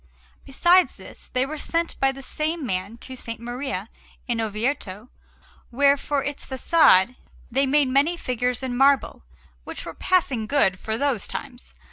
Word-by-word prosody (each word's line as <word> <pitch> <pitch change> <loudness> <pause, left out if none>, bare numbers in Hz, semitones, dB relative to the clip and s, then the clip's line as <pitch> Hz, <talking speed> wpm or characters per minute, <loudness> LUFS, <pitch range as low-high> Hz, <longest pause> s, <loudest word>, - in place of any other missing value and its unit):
Besides 350 +7 +4
this, - - -14
they 255 +1 +1
were 305 +2 -6
sent 335 +2 -1
by 270 0 +3
the 270 0 -10
same 310 +2 -2
man 195 +1 -3
to 260 - -7
S. 255 - -9
Maria 240 -3 -5 0.4
in 235 -2 0
Orvieto, 220 0 -3 0.6
where, 280 +3 +4
for 285 0 -2
its 285 0 -4
façade, 255 - +4 0.3
they 270 +3 +2
made 285 0 +3
many 280 +7 +2
figures 250 -2 -2
in 255 -2 -3
marble 275 +2 +3 0.4
which - - -7
were - - -6
passing 275 -12 0
good 195 -10 +2
for 220 0 -2
those 270 -6 -1
times. 250 -3 -8
265 Hz, 155 wpm, -24 LUFS, 235-285 Hz, 0.6 s, Besides